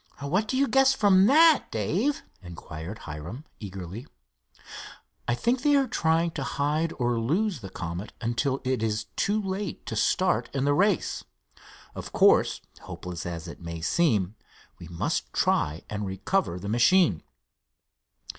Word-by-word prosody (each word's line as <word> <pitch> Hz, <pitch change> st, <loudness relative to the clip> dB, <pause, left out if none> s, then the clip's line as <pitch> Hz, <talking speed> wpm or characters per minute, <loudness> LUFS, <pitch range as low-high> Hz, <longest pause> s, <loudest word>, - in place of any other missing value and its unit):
"What 185 Hz, +10 st, 0 dB
do 260 Hz, -, -1 dB
you 275 Hz, +1 st, +3 dB
guess 270 Hz, 0 st, +4 dB
from 200 Hz, -4 st, +5 dB
that, 315 Hz, +3 st, +6 dB
Dave?" 195 Hz, -, -1 dB, 0.2 s
inquired 85 Hz, +1 st, -8 dB
Hiram, 85 Hz, -, -7 dB
eagerly. 95 Hz, +2 st, -7 dB, 1.2 s
"I 120 Hz, -, +2 dB
think 240 Hz, -, 0 dB
they 290 Hz, +1 st, +4 dB
are 275 Hz, -1 st, +4 dB
trying 165 Hz, -2 st, +1 dB
to 140 Hz, -, -4 dB
hide 150 Hz, +4 st, -1 dB
or 120 Hz, -2 st, 0 dB
lose 175 Hz, -, 0 dB
the 95 Hz, -, -7 dB
Comet 85 Hz, +2 st, -6 dB
until 130 Hz, +4 st, -1 dB
it 130 Hz, -3 st, -1 dB
is 110 Hz, -1 st, -1 dB
too 210 Hz, +2 st, +1 dB
late 195 Hz, 0 st, -4 dB
to -, -, -4 dB
start 180 Hz, -10 st, +1 dB
in 135 Hz, 0 st, 0 dB
the 145 Hz, -, +3 dB
race. 195 Hz, +5 st, +1 dB, 0.7 s
Of -, -, -8 dB
course, -, -, +4 dB, 0.2 s
hopeless 90 Hz, -1 st, -7 dB
as 85 Hz, -2 st, -6 dB
it -, -, -10 dB
may 85 Hz, -1 st, -6 dB
seem, 105 Hz, -, +1 dB, 0.5 s
we 85 Hz, -, -9 dB
must 85 Hz, -7 st, -2 dB
try 75 Hz, +3 st, +1 dB
and 105 Hz, 0 st, -4 dB
recover 95 Hz, -, -1 dB
the 100 Hz, -, -7 dB
machine." 120 Hz, -, +4 dB
130 Hz, 145 wpm, -27 LUFS, -, 1.2 s, that